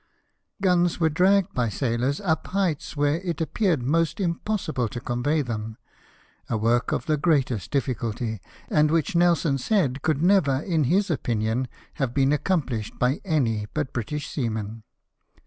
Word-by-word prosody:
Guns 175 -2 +3
were 160 -2 +2
dragged 185 +3 +3
by 125 - +1
the 110 - -2
sailors 125 +2 0
up 165 -5 0
heights 180 -6 -1
where 145 +2 +2
it 175 -2 -4
appeared 170 - +1
almost 160 +6 +1
impossible 170 - -1
to 120 - -5
convey 135 +6 0
them 110 -2 -5 0.4
— - - -33
a 115 - 0
work 115 +3 +1
of - - -1
the 155 -3 +1
greatest 140 - +1
difficulty, 115 -5 -2 0.3
and 150 0 +3
which 165 +1 0
Nelson 170 -5 +3
said 140 - +1
could 155 0 0
never, 180 -7 +4
in 160 -4 +1
his 190 +7 +2
opinion, 120 -2 -1 0.3
have 125 -2 -1
been 135 0 +3
accom 165 +3 +1
plished 110 -5 -5
by 125 +3 +1
any 120 - 0
but 145 -3 -2
British 145 +5 -3
seamen. 110 -4 -3
145 Hz, 160 wpm, -25 LUFS, 120-170 Hz, 0.4 s, never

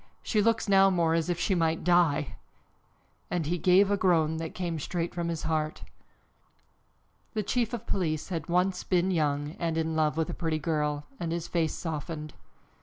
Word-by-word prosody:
She 215 - +1
looks 225 +1 +1
now 195 -1 +6
more 170 -3 +2
as 165 +1 0
if 175 -1 -1
she 195 - +1
might 165 -2 +1
die!" 165 -5 +2 0.9
and 175 -3 -1
he 175 +4 -1
gave 190 +4 +5
a 205 - +2
groan 160 -4 +2
that 160 0 -5
came 170 -3 -3
straight 170 +3 -3
from 170 -1 -2
his 165 -2 -3
heart. 155 -1 -2 1.5
The 215 - 0
chief 235 +2 0
of 240 -3 -5
police 155 -4 -1
had 165 -4 -4
once 180 +1 +1
been 185 0 +1
young 145 -3 0
and 165 -1 -1
in 160 0 -1
love 155 -1 +1
with 160 - 0
a - - -5
pretty 160 -2 -1
girl 150 -2 -1
and 165 -1 -3
his 170 0 -3
face 165 -2 0
softened. 155 -2 -5
165 Hz, 180 wpm, -28 LUFS, 155-180 Hz, 1.5 s, now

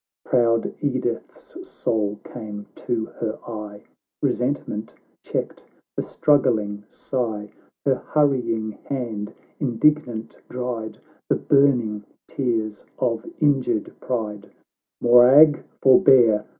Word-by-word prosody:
— - - -69
IX - - -17
Proud 115 -2 +2
Edith's 130 -5 -4
soul 105 -2 -1
came 105 -3 -8
to 115 -2 -2
her 110 -2 -2
eye, 105 -3 -7 0.4
Resentment 125 -4 -2 0.3
checked - - -4 0.3
the - - -1
struggling 110 -8 +1
sigh, 110 -6 -3 0.3
Her 135 - +4
hurrying 120 -7 +1
hand 115 -6 -4 0.3
indignant 125 -3 0
dried 125 -3 -4 0.3
The - - +4
burning 125 -7 +2 0.2
tears 110 -5 -2
of 115 -3 -1
injured 135 -7 +1
pride 105 -5 -4 0.2
— - - -66
" - - -66
Morag, 130 +6 +7 0.2
forbear 125 - +6
120 Hz, 105 wpm, -23 LUFS, 110-130 Hz, 0.4 s, Morag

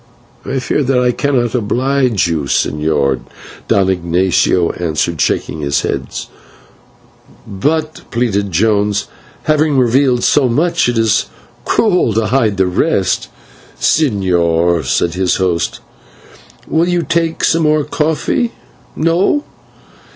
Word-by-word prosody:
"I 135 - -3
fear 130 +3 -1
that 135 -1 +1
I 125 0 +2
cannot 125 -3 0
oblige 125 -1 +1
you, 80 -4 -2
señor," 75 -2 0 0.5
Don 95 -2 +2
Ignatio 90 -1 +1
answered, 85 -1 -2
shaking 80 - -1
his 70 -1 0
head. - - -3 1.4
"But," 155 +10 -2
pleaded 105 -4 -1
Jones, 105 +2 +1 0.4
"having 155 -2 +2
revealed 125 0 +2
so 135 -4 +3
much, 165 +3 +1
it 120 - -1
is 115 -2 +2 0.4
cruel 180 - +2
to 110 +1 0
hide 110 -3 +1
the 95 - +3
rest." 90 0 0 0.5
"Señor," 85 - +1
said 85 +6 0
his 90 -1 0
host, 90 -3 -1 0.9
"will 165 +2 +1
you 175 -1 0
take 165 -1 -1
some 165 - +2
more 155 -1 +2
coffee? 160 - -1 0.4
No. 170 - +1
115 Hz, 115 wpm, -15 LUFS, 90-150 Hz, 1.4 s, so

